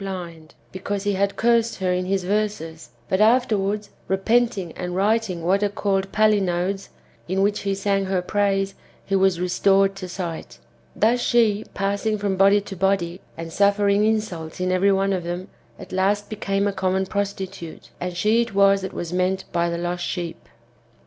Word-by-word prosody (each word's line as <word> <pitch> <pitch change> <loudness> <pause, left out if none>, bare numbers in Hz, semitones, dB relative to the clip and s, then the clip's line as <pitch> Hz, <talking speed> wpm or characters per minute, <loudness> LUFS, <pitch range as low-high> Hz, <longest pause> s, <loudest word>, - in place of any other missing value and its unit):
blind, 170 -5 -7 0.2
because 195 +1 -4
he 205 0 0
had 200 +1 0
cursed 230 0 +2
her 185 -1 0
in 180 0 -1
his 190 0 0
verses, 185 - -2 0.2
but 190 - +1
afterwards, 210 -3 +2 0.2
repenting 195 -1 +1
and 180 +1 -5
writing 200 -3 0
what 190 +4 +2
are 205 - +2
called 195 -1 -1
palinodes^ 195 -3 +1 0.4
in 190 +2 -1
which 205 +1 +1
he 195 -1 -1
sang 195 0 0
her 190 -1 0
praise, 195 +1 0 0.3
he 195 - 0
was 190 -2 +3
restored 195 +2 +2
to 185 -2 -7
sight. 175 -3 -6 0.4
Thus 235 +3 +3
she, 225 -4 +2
passing 200 +2 0
from 200 -2 -1
body 200 +2 +5
to 195 - -8
body, 185 -1 0 0.2
and 165 0 -7
suffering 200 +1 +3
insults 210 -8 -1
in 185 0 0
every 190 +2 +3
one 195 0 +1
of 185 -2 -2
them, 175 +2 -5 0.3
at - - -11
last 200 +3 0
became 200 -1 -1
a 200 - -1
common 190 0 0
prostitute; 195 -4 -5
and 180 0 -4
she 220 +4 +3
it 230 -4 -4
was 195 0 +5
that 190 - -5
was 175 0 -5
meant 185 +1 0
by 170 0 +1
the 170 - -2
lost 175 +1 -3
sheep. 170 -2 -5
195 Hz, 175 wpm, -23 LUFS, 180-205 Hz, 0.4 s, body